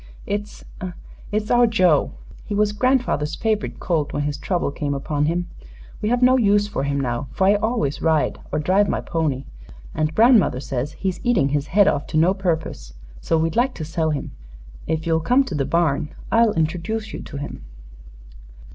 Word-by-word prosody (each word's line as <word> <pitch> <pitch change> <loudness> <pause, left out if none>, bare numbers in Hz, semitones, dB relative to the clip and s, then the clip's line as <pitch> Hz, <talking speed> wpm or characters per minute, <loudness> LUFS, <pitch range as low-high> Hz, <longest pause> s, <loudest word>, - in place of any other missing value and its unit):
"It's 205 +1 -5 0.7
it's 210 0 -1
our 240 0 +5
Joe. 185 -9 +3 0.3
He 205 - -4
was 210 0 +2
grandfather's 235 - +1
favorite 220 -2 -1
colt 160 -5 -1
when 145 - -1
his 145 0 -2
trouble 175 -5 -1
came 145 0 -3
upon 145 +1 -1
him. 175 +3 -1 0.5
We 210 - 0
have 245 +1 +1
no 255 +1 +6
use 205 -2 +3
for 205 - -3
him 140 0 -1
now, 120 -1 -2
for 190 - 0
I 200 - +6
always 205 - -1
ride 160 -2 +1
or - - 0
drive 190 +7 +2
my - - 0
pony. 150 -6 -2 0.5
And 155 0 -1
grandmother 225 - +5
says 135 +2 -3
he's 190 +1 -3
eating 220 - +2
his 145 0 -1
head 200 +2 +4
off 145 -7 0
to - - -2
no 170 +4 +4
purpose; 160 - -3 0.3
so 165 - +1
we'd 160 0 0
like 250 +2 +1
to 155 - -5
sell 160 0 -1
him. 145 -3 -3 0.6
If 160 0 -1
you 165 - +1
will 160 - +3
come 250 - +3
to 230 - -6
the 140 -3 0
barn 155 -3 +1 0.2
I'll 230 -1 +4
introduce 180 +8 -2
you - - -5
to - - -8
him." 140 - -7
165 Hz, 190 wpm, -22 LUFS, 150-210 Hz, 0.7 s, no